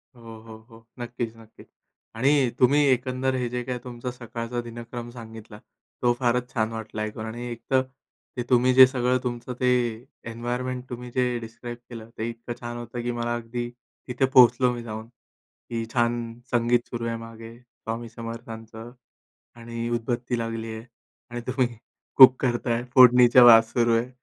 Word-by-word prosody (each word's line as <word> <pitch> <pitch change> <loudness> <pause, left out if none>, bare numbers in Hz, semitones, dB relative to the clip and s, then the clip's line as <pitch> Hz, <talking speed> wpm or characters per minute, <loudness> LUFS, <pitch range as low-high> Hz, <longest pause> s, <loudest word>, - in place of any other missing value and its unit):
हो, 115 -2 -11
हो, 110 0 -12
हो, 115 -1 -17
नक्कीच-नक्कीच. 115 -2 -7 0.5
आणि 135 +2 +3
तुम्ही 135 +4 +5
एकंदर 130 +1 0
हे 125 -1 -1
जे 125 0 -3
काही 125 0 -4
तुमचा 125 0 -6
सकाळचा 120 0 -5
दिनक्रम 120 0 -8
सांगितला, 115 -2 -11 0.4
तो 120 -1 +3
फारच 125 0 0
छान 110 -2 0
वाटला 110 -1 -6
ऐकून 110 +1 -4
आणि 120 +2 -6
एकतर 120 +3 0 0.6
ते 120 - -1
तुम्ही 125 +1 +4
जे 130 0 +10
सगळं 125 -1 0
तुमचं 120 0 -4
ते 125 - +1 0.6
एन्व्हायर्नमेंट 125 +2 -4
तुम्ही 125 0 -7
जे 125 -1 +1
डिस्क्राईब 115 +1 -8
केलं, 115 -2 -9
ते 115 +1 -2
इतकं 115 +1 -7
छान 120 0 -6
होतं 120 0 -6
की 120 - -1
मला 120 0 -2
अगदी 120 +1 -5 0.4
तिथे 125 +1 +1
पोहोचलो 125 0 +6
मी 120 -1 -6
जाऊन, 110 0 -7
की 115 -1 -10
छान 120 -1 -1
संगीत 120 0 +2
सुरू 120 -1 -4
आहे 115 - -2
मागे 115 0 -11
स्वामी 115 -1 -7
समर्थांचं 115 0 -9 0.6
आणि 115 0 -5
उदबत्ती 120 +1 -2
लागली 115 -1 -4
आहे 110 +1 -8 0.4
आणि 120 0 -5
तुम्ही 130 -1 +1 0.5
कुक 130 -1 +10
करत 120 -1 -1
आहे, 120 0 0
फोडणीच्या 125 -1 +7
वास 115 -1 +7
सुरू 120 -1 +2
आहे. 115 +2 -1
120 Hz, 160 wpm, -25 LUFS, 115-125 Hz, 0.6 s, जे